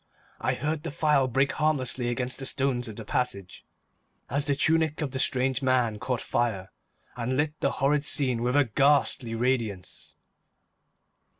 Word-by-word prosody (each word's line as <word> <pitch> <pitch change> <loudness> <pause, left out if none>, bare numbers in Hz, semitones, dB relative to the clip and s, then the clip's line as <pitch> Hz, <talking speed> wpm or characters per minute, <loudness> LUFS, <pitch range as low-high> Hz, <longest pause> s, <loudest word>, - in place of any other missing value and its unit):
I - - 0
heard 150 +3 -2
the 165 - -4
phial 150 -3 +2
break 135 +3 +1
harmlessly 130 -5 0
against 125 +1 -3
the 135 - -3
stones 130 -3 0
of 110 - -8
the 115 - -8
passage 100 -6 -3 0.7
as 140 +2 +1
the 140 - +2
tunic 160 +1 +2
of 150 -4 -2
the 130 - -3
strange 130 +1 +1
man 125 -5 +1
caught 125 0 -2
fire 110 -6 -1 0.4
and 125 +2 -2
lit 150 +1 +1
the 140 - 0
horrid 140 +2 +1
scene 130 -5 0
with 125 +2 0
a 145 - +6
ghastly 135 -1 +2
radiance. 115 -6 -2
130 Hz, 160 wpm, -27 LUFS, 120-145 Hz, 0.7 s, a